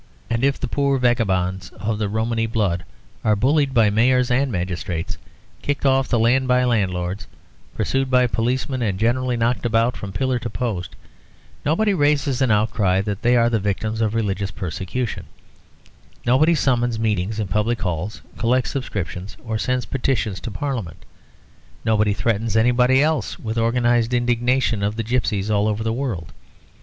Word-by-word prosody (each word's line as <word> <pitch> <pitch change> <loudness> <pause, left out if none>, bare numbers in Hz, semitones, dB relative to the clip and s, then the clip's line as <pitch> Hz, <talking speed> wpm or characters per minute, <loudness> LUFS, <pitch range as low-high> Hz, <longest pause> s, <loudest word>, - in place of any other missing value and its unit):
And 115 +2 0
if 140 0 +2
the 130 - -2
poor 140 +2 +1
vagabonds 95 -7 0
of 110 0 -2
the 105 -2 -1
Romany 115 +2 0
blood 100 -7 -1 0.4
are 105 - +3
bullied 140 +5 +2
by 115 -5 +4
mayors 125 +3 +3
and 135 +2 +2
magistrates, 90 -3 -3 0.5
kicked 145 0 -2
off 135 -1 +3
the 120 - +1
land 125 +4 +3
by 125 0 +3
landlords, 95 -7 -1 0.5
pursued 135 0 0
by 125 -1 +4
policemen 125 +3 -1
and 100 -5 0
generally 120 +3 +1
knocked 115 +1 0
about 115 +1 +2
from 100 - -6
pillar 130 +4 0
to 115 - -4
post, 105 -4 -4 0.7
nobody 200 +8 +2
raises 145 -5 +1
an 130 - +3
outcry 105 -3 +2
that 100 0 -4
they 120 +1 +4
are 115 0 +4
the 115 -2 +1
victims 110 +3 -2
of 110 0 0
religious 100 -3 -1
persecution; 95 +7 -4 1.0
nobody 145 +8 +4
summons 120 -5 +1
meetings 105 -1 -1
in 105 - -1
public 105 +5 0
halls, 90 +4 -3 0.2
collects 125 +2 +1
subscriptions 95 - -5
or 110 -1 -2
sends 125 +4 -1
petitions 120 -7 -1
to - - -6
parliament; 100 - -4 0.8
nobody 105 -2 +2
threatens 110 0 0
anybody 125 +3 +4
else 155 0 0
with 110 -1 -4
the 115 - 0
organised 120 0 +2
indignation 120 -1 +1
of 105 +1 -1
the 115 - -2
gipsies 110 -3 -1
all 105 0 +2
over 110 +1 -1
the 110 0 -1
world. 115 -10 -4
115 Hz, 160 wpm, -21 LUFS, 105-125 Hz, 1.0 s, by